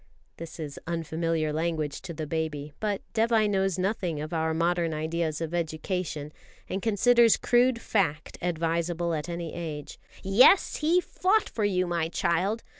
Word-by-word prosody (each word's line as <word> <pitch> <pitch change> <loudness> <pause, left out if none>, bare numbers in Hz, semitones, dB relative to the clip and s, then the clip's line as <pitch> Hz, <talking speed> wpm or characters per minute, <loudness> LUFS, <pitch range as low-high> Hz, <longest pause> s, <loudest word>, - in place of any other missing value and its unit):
This 165 0 -9
is 150 -3 -6
unfamiliar 165 -1 -1
language 155 -2 -2
to 190 - -7
the 155 0 -4
baby; 150 -2 -3
but 210 -2 -2
Dévai 225 -1 +3
knows 195 -2 +1
nothing 185 -4 -1
of 155 +2 -5
our 160 -1 0
modern 170 0 0
ideas 160 0 -2
of 165 0 -3
education, 160 -2 -3 0.3
and 190 - -3
considers 230 +2 +4
crude 245 0 +3
fact 165 -10 -1
advisable 170 0 -1
at 155 +2 -3
any 170 -2 -4
age. 155 -4 -6 0.2
"Yes, 230 - +5
he 335 +4 +3
fought 395 +4 +1
for 215 - -2
you, 185 -2 +1
my 170 -2 -1
child. 190 +7 0
170 Hz, 150 wpm, -27 LUFS, 160-195 Hz, 0.3 s, Yes